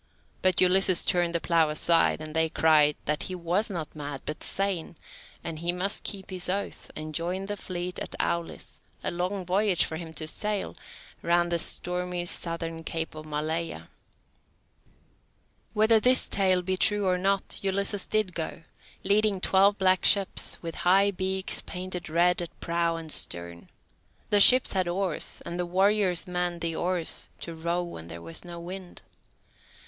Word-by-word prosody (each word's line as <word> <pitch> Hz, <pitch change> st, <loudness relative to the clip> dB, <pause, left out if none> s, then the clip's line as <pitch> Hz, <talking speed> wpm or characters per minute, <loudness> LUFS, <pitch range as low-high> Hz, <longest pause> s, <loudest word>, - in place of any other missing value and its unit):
But 185 Hz, -1 st, +3 dB
Ulysses 185 Hz, 0 st, +4 dB
turned 175 Hz, -2 st, +1 dB
the -, -, +2 dB
plough 165 Hz, -2 st, +2 dB
aside, 165 Hz, +1 st, +2 dB
and 155 Hz, 0 st, -7 dB
they 160 Hz, 0 st, +2 dB
cried 155 Hz, -2 st, +4 dB
that 150 Hz, 0 st, -1 dB
he 185 Hz, -, -4 dB
was 180 Hz, +5 st, 0 dB
not 170 Hz, -6 st, -6 dB
mad, 145 Hz, -2 st, -6 dB
but 150 Hz, -, -5 dB
sane, 195 Hz, -4 st, -1 dB, 0.5 s
and 165 Hz, -2 st, -5 dB
he 170 Hz, +1 st, 0 dB
must 185 Hz, +3 st, -3 dB
keep 195 Hz, -2 st, -3 dB
his 180 Hz, -1 st, -3 dB
oath, 200 Hz, +2 st, -4 dB
and 155 Hz, 0 st, -6 dB
join 180 Hz, +4 st, -3 dB
the 205 Hz, +1 st, -4 dB
fleet 180 Hz, -2 st, -5 dB
at -, -, -5 dB
Aulis, 170 Hz, -1 st, -3 dB, 0.2 s
a -, -, -1 dB
long 180 Hz, +2 st, -3 dB
voyage 190 Hz, 0 st, +2 dB
for 160 Hz, -, -5 dB
him 165 Hz, -1 st, -8 dB
to 155 Hz, 0 st, -4 dB
sail, 210 Hz, +5 st, -2 dB, 0.5 s
round 175 Hz, 0 st, +1 dB
the 170 Hz, -, +2 dB
stormy 180 Hz, +1 st, 0 dB
southern 165 Hz, -1 st, -3 dB
Cape 160 Hz, 0 st, -4 dB
of 155 Hz, 0 st, -10 dB
Maleia. 155 Hz, +2 st, -3 dB, 1.8 s
Whether 220 Hz, +1 st, +5 dB
this 255 Hz, +3 st, +4 dB
tale 185 Hz, -2 st, +2 dB
be 185 Hz, +1 st, -1 dB
true 205 Hz, +1 st, +3 dB
or 180 Hz, -1 st, +1 dB
not, 195 Hz, +1 st, -1 dB
Ulysses 200 Hz, 0 st, -1 dB
did 215 Hz, -4 st, 0 dB
go, 165 Hz, 0 st, -4 dB, 0.4 s
leading 205 Hz, 0 st, +2 dB
twelve 195 Hz, +2 st, +3 dB
black 185 Hz, -1 st, +2 dB
ships, 200 Hz, -2 st, +5 dB
with 165 Hz, -1 st, -4 dB
high 195 Hz, +3 st, +4 dB
beaks 190 Hz, 0 st, -1 dB
painted 180 Hz, -2 st, -5 dB
red 175 Hz, +2 st, +2 dB
at 170 Hz, -, -8 dB
prow 170 Hz, 0 st, 0 dB
and 165 Hz, -1 st, -6 dB
stern. 85 Hz, -5 st, -3 dB, 0.6 s
The 205 Hz, -, +5 dB
ships 255 Hz, +5 st, +7 dB
had 185 Hz, -2 st, +1 dB
oars, 180 Hz, -1 st, -2 dB
and 170 Hz, +1 st, -5 dB
the 180 Hz, -, 0 dB
warriors 190 Hz, 0 st, +2 dB
manned 180 Hz, -1 st, -2 dB
the 165 Hz, 0 st, -1 dB
oars, 175 Hz, -1 st, -1 dB
to 170 Hz, -, -6 dB
row 170 Hz, +2 st, -2 dB
when 85 Hz, -, -9 dB
there 85 Hz, 0 st, -9 dB
was 80 Hz, 0 st, -5 dB
no 175 Hz, -1 st, -8 dB
wind. 180 Hz, +1 st, -8 dB
180 Hz, 165 wpm, -27 LUFS, 165-190 Hz, 1.8 s, ships